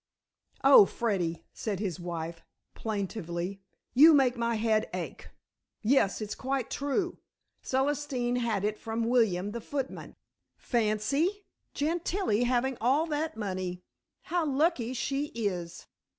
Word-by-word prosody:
"Oh, 270 -7 +9
Freddy," 175 -8 -2
said 205 -4 -3
his 185 -4 -3
wife 170 -1 -5 0.3
plaintively. 195 -3 -4 0.3
"You 305 +5 +8
make 260 -3 +4
my 235 -1 0
head 220 0 +1
ache. - - -6 0.5
Yes, 220 -4 +3
it's 210 -1 -3
quite 265 -2 -2
true. 285 +6 -1 0.4
Celestine 265 -2 0
had 225 -5 0
it 210 0 -1
from 225 +1 -2
William 220 -5 +2
the 235 +1 -5
footman. 270 +2 -5 0.4
Fancy, 260 - 0 0.3
Gentilla 320 - 0
having 250 +1 0
all 270 +7 +3
that 310 -4 -2
money. 185 -3 -3 0.4
How 350 0 0
lucky 275 -4 +1
she 275 +4 -1
is." 180 -7 -3
235 Hz, 120 wpm, -29 LUFS, 200-275 Hz, 0.5 s, Oh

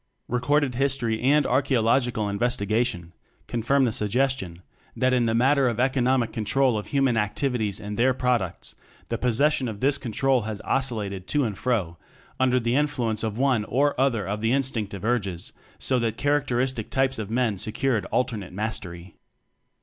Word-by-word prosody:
Recorded 130 +3 +1
history 125 -4 0
and 145 +4 +3
archaeologic 125 -2 +2
al 105 -1 0
investigation 105 -3 -1 0.3
confirm 130 +4 +1
the 120 - +1
sugges 125 +6 +1
tion 90 -6 -9 0.3
that 130 0 +2
in 120 -2 +2
the 115 - +1
matter 135 +2 +3
of 120 -1 -3
economic 130 -2 +1
control 125 +3 +1
of 105 - -4
human 135 -5 +1
activities 110 -1 -1
and 105 +1 -6
their 130 +2 +4
products, 125 -8 -1 0.4
the 115 - -2
possession 135 +3 +2
of 110 -3 -6
this 140 +3 +2
con 120 -4 -5
trol 130 -1 +1
has 110 -2 -4
oscillated 105 -8 -2
to 145 -1 +1
and 110 -5 -2
fro 95 -9 -1 0.4
under 130 -1 +3
TECHNOCRACY - - -8
the 120 +1 +1
influence 130 -7 0
of 110 -1 -2
one 130 -4 +2
or 140 +2 +1
other 120 -8 +1
of 105 +2 -3
the 115 +1 +1
instinctive 115 -8 -2
urges, 100 -8 -2 0.2
so 130 -1 0
that 115 -2 -1
character 145 -3 +1
istic 125 -3 -1
types 130 -2 0
of 105 -2 -4
men 115 -2 +1
secured 110 +3 -1
alternate 110 -8 -2
mastery. 90 -4 -5
120 Hz, 170 wpm, -25 LUFS, 105-135 Hz, 0.4 s, their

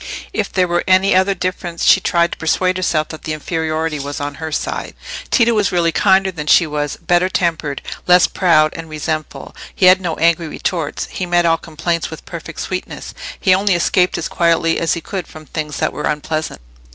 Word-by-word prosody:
If - - -2
there 185 -1 +2
were 175 0 0
any 185 +1 +4
other 190 +1 +3
difference 180 -2 -4
she - - +6
tried 170 -1 +1
to - - -6
persuade 185 +3 +1
herself 155 -4 0
that 160 - -8
the 155 - -4
inferiority 160 0 -2
was 145 +2 -5
on 145 0 -4
her 160 0 -4
side. - - -3 0.3
Tito 235 -2 +3
was 210 -4 +1
really 170 -2 +2
kinder 190 +2 +3
than 150 -4 -7
she 170 - +6
was, 150 -2 -3
better 175 +1 +1
tempered, 165 -6 -1 0.2
less 180 -1 +6
proud 155 -4 +3
and 165 -1 -7
resentful; 155 0 -5 0.2
he 190 - +2
had 185 +1 +7
no 170 -3 -2
angry 170 0 +2
retorts, 160 -1 -3
he 185 - -4
met 175 0 +2
all 165 -1 +3
complaints 165 +1 -3
with - - -10
perfect - - -7
sweetness; - - -5 0.3
he 185 - +4
only 195 0 +2
escaped 180 +1 +2
as 170 - -3
quietly 165 -1 +1
as 165 - +1
he 170 - -5
could 190 -3 -5
from 155 0 -12
things 150 -1 -5
that - - -1
were 150 - -4
unpleasant. 155 - -3
170 Hz, 200 wpm, -18 LUFS, 155-185 Hz, 0.3 s, had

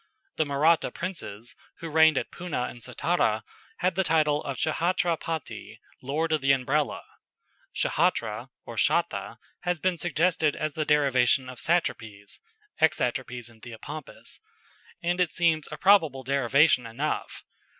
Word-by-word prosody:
The 155 - +1
Mahratta 155 +4 +3
princes, 120 - -5 0.2
who 165 - -7
reigned 160 -1 +5
at - - -2
Poonah 175 -8 -3
and 120 - -13
Sattara, 120 -3 0 0.4
had 185 +1 +2
the 190 +2 +1
title 155 -3 +2
of 140 -2 -4
Ch'hatra 170 +2 +1
pati, 165 -1 -6 0.2
"Lord 155 +5 -1
of 155 -2 +1
the 135 0 +4
Umbrella." 135 +3 0 0.7
Ch'hatra - - 0 0.2
or - - -9
cháta - - 0 0.2
has 175 -2 -1
been 185 -1 0
suggested 160 -2 +1
as 155 -1 -3
the 155 0 -2
derivation 135 -3 +3
of 130 -1 -9
satrapaes 110 -12 -2 0.4
(exatrapaes 125 -5 0
in 115 -2 -16
Theopompus), 135 +5 -9 0.6
and 175 +1 +1
it 180 - +2
seems 160 -3 +1
a 150 - -5
probable 160 -9 +4
derivation 135 0 +3
enough. 135 +7 -3
150 Hz, 135 wpm, -27 LUFS, 130-165 Hz, 0.7 s, reigned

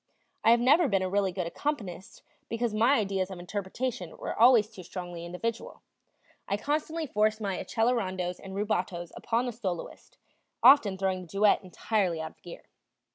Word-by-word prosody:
I - - +5
have 235 +1 +6
never 280 +7 +5
been 195 -4 +1
a 185 - -1
really 200 -1 +1
good 180 -1 -3
accompanist 195 - -5 0.3
because 230 -1 -1
my 230 +5 +4
ideas 195 -4 0
of 190 - -7
interpretation 190 +1 -4
were - - -4
always 230 -2 +6
too 195 - -12
strongly 175 -1 -7
individual. 225 +7 -5 0.6
I 200 - 0
constantly 310 +6 -2
forced 215 -3 +1
my 200 -3 -2
accelerandos 190 -7 -1
and 190 0 -8
rubatos 180 -4 -2
upon 235 +1 -1
the 245 - -2
soloist, 190 -7 -6 0.5
often 240 -7 +7
throwing 190 -1 -1
the 180 - -11
duet 200 +4 +3
entirely 185 -2 -1
out 160 0 -5
of - - -31
gear. 175 - -10
200 Hz, 165 wpm, -29 LUFS, 185-230 Hz, 0.6 s, often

